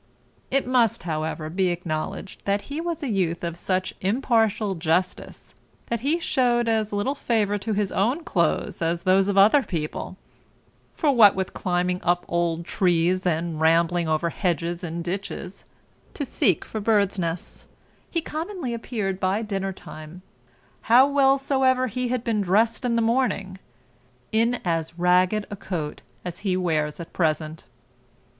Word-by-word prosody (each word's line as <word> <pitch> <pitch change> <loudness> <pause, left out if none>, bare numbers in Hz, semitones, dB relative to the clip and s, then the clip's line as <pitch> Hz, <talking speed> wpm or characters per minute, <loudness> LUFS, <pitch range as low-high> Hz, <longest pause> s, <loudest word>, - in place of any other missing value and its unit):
It 275 +1 +1
must, 245 -7 +2
however, 155 -1 -3
be 185 +4 0
acknowledged 175 +1 -4
that 200 0 0
he 310 - -2
was 335 -3 -3
a - - -1
youth 180 -7 -1
of 170 -1 -3
such 185 +1 -2
impartial 220 -1 +1
justice, 175 +2 -2 0.4
that 235 - -1
he 285 +8 +1
shewed 245 -7 +1
as 220 -2 +1
little 205 +7 0
favour 215 -6 0
to 220 +2 -2
his 200 -2 0
own 245 - 0
clothes - - 0
as 170 +1 0
to - - -27
those 190 +1 +4
of 200 -1 0
other 215 +9 +6
people; 170 -3 -4 0.8
for 300 -4 +2
what 220 -6 +7
with 190 -1 -3
climbing 180 0 -1
up 175 0 +1
old 170 -1 -1
trees, 180 +1 +1
and 165 -1 -1
rambling 165 +1 +3
over 160 +2 0
hedges 175 -1 -2
and 170 0 -4
ditches, 185 +1 -5 0.5
to 285 - -3
seek 190 - +1
for 220 - -5
birds 200 -2 +2
nests, 170 -1 -4 0.4
he 335 - 0
commonly 320 -4 -4
appeared 215 -5 -3
by 195 +4 0
dinner 195 -2 -2
time, 175 -1 -11 0.7
how 250 +4 +7
well 275 -1 +4
soever 265 -2 +2
he 250 +1 -2
had 245 -1 -1
been 225 -4 0
dressed 215 +6 +2
in 240 -2 +1
the 230 - +2
morning, 220 -6 0 0.7
in 230 +2 +2
as 165 -1 -1
ragged 180 +4 +3
a - - -3
coat 175 -6 -5 0.2
as 175 -1 -5
he 190 -3 0
wears 155 -4 -1
at 170 - -9
present. 155 -1 -1
195 Hz, 155 wpm, -24 LUFS, 170-230 Hz, 0.8 s, what